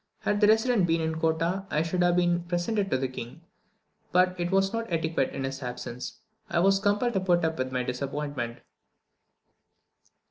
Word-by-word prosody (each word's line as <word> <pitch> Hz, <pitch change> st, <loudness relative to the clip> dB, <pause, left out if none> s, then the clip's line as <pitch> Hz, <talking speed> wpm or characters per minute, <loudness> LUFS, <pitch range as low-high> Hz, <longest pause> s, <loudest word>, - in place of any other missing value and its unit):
Had 205 Hz, 0 st, 0 dB
the 205 Hz, -, +6 dB
resident 220 Hz, -3 st, +4 dB
been 165 Hz, 0 st, +2 dB
in 160 Hz, 0 st, -2 dB
Kottah 165 Hz, +4 st, 0 dB
I 150 Hz, -, +1 dB
should 180 Hz, +2 st, -1 dB
have 175 Hz, 0 st, +4 dB
been 175 Hz, -1 st, +2 dB
presented 195 Hz, +4 st, -1 dB
to -, -, +2 dB
the 130 Hz, 0 st, -1 dB
king, 130 Hz, +4 st, -8 dB, 0.7 s
but 180 Hz, +1 st, +5 dB
as 180 Hz, 0 st, -13 dB
it 175 Hz, +1 st, -1 dB
was 195 Hz, +1 st, +2 dB
not 230 Hz, -3 st, -3 dB
etiquette 160 Hz, -4 st, 0 dB
in 135 Hz, -, -5 dB
his 135 Hz, +1 st, -4 dB
absence, 125 Hz, -, -6 dB, 0.3 s
I -, -, -1 dB
was 195 Hz, +2 st, +4 dB
compelled 205 Hz, +4 st, +1 dB
to 190 Hz, -, +2 dB
put 175 Hz, -3 st, +2 dB
up 160 Hz, 0 st, -2 dB
with 130 Hz, 0 st, -1 dB
my 125 Hz, -1 st, -1 dB
disappointment. 135 Hz, -1 st, -4 dB
175 Hz, 185 wpm, -27 LUFS, 145-195 Hz, 0.7 s, the